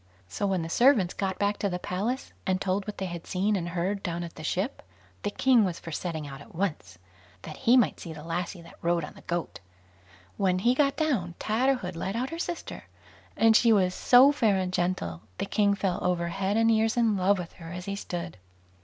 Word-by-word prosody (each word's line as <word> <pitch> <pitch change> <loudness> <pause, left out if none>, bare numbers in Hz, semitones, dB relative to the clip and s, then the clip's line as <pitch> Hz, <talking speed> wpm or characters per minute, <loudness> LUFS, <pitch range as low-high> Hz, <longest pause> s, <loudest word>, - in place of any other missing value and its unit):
So 200 - -2
when 190 -3 0
the - - -4
servants 225 -1 +4
got 190 -2 -2
back 205 +1 0
to 200 - 0
the 180 - -2
palace, 205 +9 -3
and 185 -1 +1
told 195 +1 -1
what 210 - -5
they 190 - -3
had 175 -2 -6
seen 200 +3 +1
and 175 -3 -2
heard 180 +4 -2
down 175 -2 -3
at 170 - -7
the 155 - -10
ship, 190 - -2 0.4
the 205 - -1
king 250 +2 +4
was 180 -4 -2
for 165 - -8
setting 160 -1 -4
out 140 0 -9
at 145 - -15
once, 150 - -3 0.5
that - - -8
he 250 0 +4
might 240 - +2
see 170 - -7
the 150 -1 -9
lassie 170 +2 -4
that 170 - -15
rode 170 -1 +1
on - - -7
the - - -15
goat. 170 -1 -4 0.8
When 185 -2 +2
he 235 +7 +3
got 275 +1 +2
down, 230 - 0
Tatterhood 220 -4 0
led 190 +4 -3
out 255 +3 -2
her 330 - -5
sister, 345 -1 -5 0.5
and 225 0 +5
she 230 +1 +5
was 185 -4 +3
so 255 +7 +6
fair 220 -8 +2
and 185 -1 -2
gentle, 175 - -1 0.2
the - - -2
king 200 0 +2
fell 190 -3 -1
over 175 -1 0
head 195 +4 -1
and 225 0 +4
ears 220 +1 +2
in 230 -3 +3
love 195 +1 +3
with 175 -2 -6
her 165 0 -8
as 180 0 -6
he 200 - -3
stood. 175 -3 -5
190 Hz, 225 wpm, -27 LUFS, 175-220 Hz, 0.8 s, so